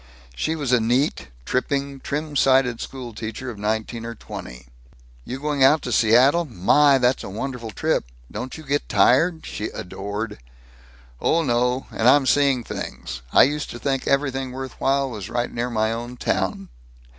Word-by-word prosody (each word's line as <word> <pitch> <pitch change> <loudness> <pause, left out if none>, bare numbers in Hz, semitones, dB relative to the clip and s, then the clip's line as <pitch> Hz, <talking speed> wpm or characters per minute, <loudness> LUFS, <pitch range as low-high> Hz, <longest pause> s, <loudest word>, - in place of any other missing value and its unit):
She 155 - -1
was 145 -5 -2
a 125 - +5
neat, 120 - 0 0.2
tripping, 140 +1 -1
trim 150 +2 -4
sided 130 -4 +3
school 125 -3 -7
teacher 110 +4 -5
of 105 - -11
nineteen 110 +2 -2
or 115 0 -6
twenty. 60 - -9 0.6
"You're 130 - -5
going 145 -2 0
out 145 +3 +5
to 125 - -4
Seattle? 125 +9 +5
My! 140 - +4
That's 125 0 +1
a - - -6
wonderful 120 +3 -5
trip. 105 - 0 0.3
Don't 130 - -6
you 155 - -10
get 145 0 -1
tired?" 160 - +3
she 105 - -5
adored. 105 +4 -5 0.8
"Oh, 165 0 +2
no. 125 0 +1
And 120 - +3
I'm 140 0 +5
seeing 135 -2 +3
things. 65 - -6
I - - +7
used 150 +2 0
to - - -7
think 135 +1 -2
everything 135 -2 0
worth 130 0 -7
while 135 0 +2
was 105 -5 -6
right 120 0 -2
near 120 +1 -2
my 110 -2 0
own 120 +2 -6
town." 95 -2 -1
125 Hz, 170 wpm, -23 LUFS, 115-140 Hz, 0.8 s, I